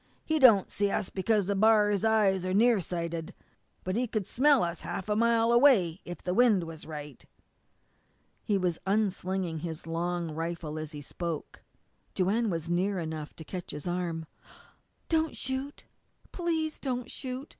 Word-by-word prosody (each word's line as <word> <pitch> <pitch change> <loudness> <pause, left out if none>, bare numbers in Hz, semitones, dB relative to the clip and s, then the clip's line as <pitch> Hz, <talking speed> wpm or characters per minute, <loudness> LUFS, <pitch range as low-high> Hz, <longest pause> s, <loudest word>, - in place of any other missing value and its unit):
He 315 0 +1
don't 225 -8 +6
see 205 0 +1
us 195 - -2
because 205 0 +1
a 200 - +1
b'ar's 210 -1 +4
eyes 210 -4 +3
are 185 0 -1
near 230 +1 +5
sighted, 170 -2 -4 0.5
but 185 +1 -2
he 245 +2 0
could 215 -3 -2
smell 280 +2 +4
us 170 -1 -3
half 190 - -5
a 210 - +2
mile 230 +1 +3
away 235 - +4
if 175 - -8
the 180 - -1
wind 225 -5 +4
was 165 -2 -8
right." 150 -4 -8 1.2
He 205 - +1
was 180 -3 -1
unslinging 190 -4 0
his 160 0 -6
long 170 0 -2
rifle 165 -1 -4
as 155 0 -6
he 145 - -7
spoke. 170 +1 -5 0.5
Joanne 210 +5 +1
was 165 -3 -3
near 185 +3 0
enough 160 -3 -5
to 160 - -9
catch 180 +3 -7
his 150 - -7
arm. 175 -2 -2 0.8
"Don't 320 -1 0
shoot 265 +2 -4 0.5
please 325 -3 -2
don't 250 -3 -3
shoot!" 260 +2 -6
190 Hz, 160 wpm, -29 LUFS, 170-230 Hz, 1.2 s, don't